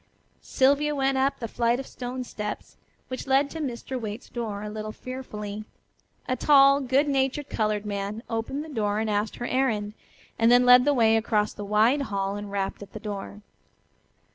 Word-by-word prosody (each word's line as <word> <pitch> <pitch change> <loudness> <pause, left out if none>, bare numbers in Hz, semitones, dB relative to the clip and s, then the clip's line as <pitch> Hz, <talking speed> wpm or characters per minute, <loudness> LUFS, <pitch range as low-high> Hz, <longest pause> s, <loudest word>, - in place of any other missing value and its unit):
Sylvia 285 +3 +2
went 270 -1 +1
up 270 +1 +1
the 230 - -4
flight 235 +2 +1
of 270 - -5
stone 255 0 -5
steps 210 -3 -6 0.3
which 255 +2 -6
led 275 +1 +3
to 325 - -6
Mr. 260 -2 -4
Waite's 215 +2 -6
door 215 -4 -4
a 210 - -5
little 215 0 -5
fearfully. 215 -4 -7 0.6
A 255 - 0
tall, 275 0 +6
good 270 +3 +2
natured 270 +1 0
colored 215 -1 0
man 205 +2 -4
opened 230 +6 -3
the - - -10
door 210 -6 -1
and 220 0 -1
asked 210 +1 -1
her 240 - -5
errand, 225 -6 0 0.5
and 230 +1 +5
then 245 0 +6
led 250 0 +8
the 290 - +4
way 225 -2 +4
across 215 -1 0
the 205 - -7
wide 215 +7 +3
hall 195 -1 -1
and 205 0 -6
rapped 195 0 -3
at 200 0 -11
a - - -5
door. 205 -1 -7
230 Hz, 185 wpm, -26 LUFS, 210-265 Hz, 0.6 s, led